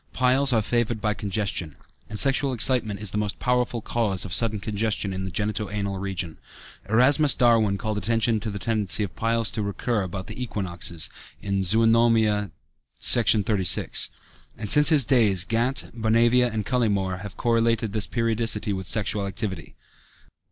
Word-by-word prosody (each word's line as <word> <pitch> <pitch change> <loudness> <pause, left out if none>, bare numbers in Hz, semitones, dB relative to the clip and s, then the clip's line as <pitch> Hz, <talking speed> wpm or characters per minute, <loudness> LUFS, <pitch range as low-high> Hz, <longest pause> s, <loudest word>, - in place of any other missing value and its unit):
Piles 130 +2 +3
are 110 -3 +1
favored 120 0 -1
by 105 0 -1
congestion, 100 -7 -3 0.3
and 110 - -6
sexual 135 +2 +2
excitement 115 -4 0
is 105 -3 -4
the 105 - -2
most 105 -1 -3
powerful 125 -2 -1
cause 105 -6 -1
of 90 - -6
sudden 110 0 +3
congestion 105 -1 -3
in 95 0 -5
the - - -4
genito 105 +2 -3
anal 100 -2 -4
region. 90 -4 -4 0.5
Erasmus 135 +6 +3
Darwin 115 -5 +2
called 110 -1 -3
attention 115 +2 0
to 110 - -5
the 100 - -5
tendency 105 -2 0
of 95 - -6
piles 115 -1 -1
to 110 - -4
recur 105 +2 -2
about 95 0 -6
the 110 +4 -9
equinoxes 85 -8 -3 0.4
(Zoönomia, 110 +1 +2 0.5
Section 115 -3 +4
XXXVI), 95 -4 +1 0.5
and 105 - -2
since 150 +1 +9
his 150 -6 +3
days 105 -9 +2
Gant, 120 +6 0
Bonavia, 120 +2 +2
and 110 -1 -4
Cullimore 100 -7 -1
have 100 -1 -9
correlated 115 -2 0
this 110 -1 0
periodicity 115 -3 0
with 95 -1 -6
sexual 105 -1 -1
activity. 95 -5 -5
110 Hz, 155 wpm, -24 LUFS, 100-115 Hz, 0.5 s, since